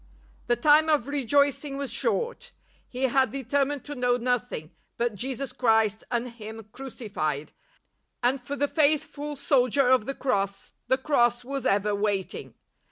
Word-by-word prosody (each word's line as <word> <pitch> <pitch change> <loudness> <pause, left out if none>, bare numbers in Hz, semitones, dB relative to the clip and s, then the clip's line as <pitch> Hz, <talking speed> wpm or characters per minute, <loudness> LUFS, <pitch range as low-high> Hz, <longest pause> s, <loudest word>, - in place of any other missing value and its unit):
The 240 - +3
time 300 +6 +5
of 290 -5 +2
rejoicing 280 +1 +1
was 280 -2 -3
short. 475 0 -1 0.4
He 255 +1 -4
had 265 0 +3
determined 275 +1 -1
to 290 - -6
know 245 -2 +1
nothing 245 -10 -2
" - - -48
but 235 -1 0
Jesus 260 +5 -4
Christ 220 -3 +2
and 240 +1 -1
Him 220 -2 -9
crucified," 195 - -4 0.7
and 255 +2 +2
for 275 +4 -5
the 285 +1 +1
faithful 295 -1 0
soldier 275 -2 +3
of 255 -4 +4
the 275 - -3
Cross, 200 -6 -1 0.2
the 260 - +3
Cross 240 -4 +2
was 275 0 -2
ever 205 +1 +2
waiting. 200 -2 -2
250 Hz, 150 wpm, -27 LUFS, 225-280 Hz, 0.7 s, time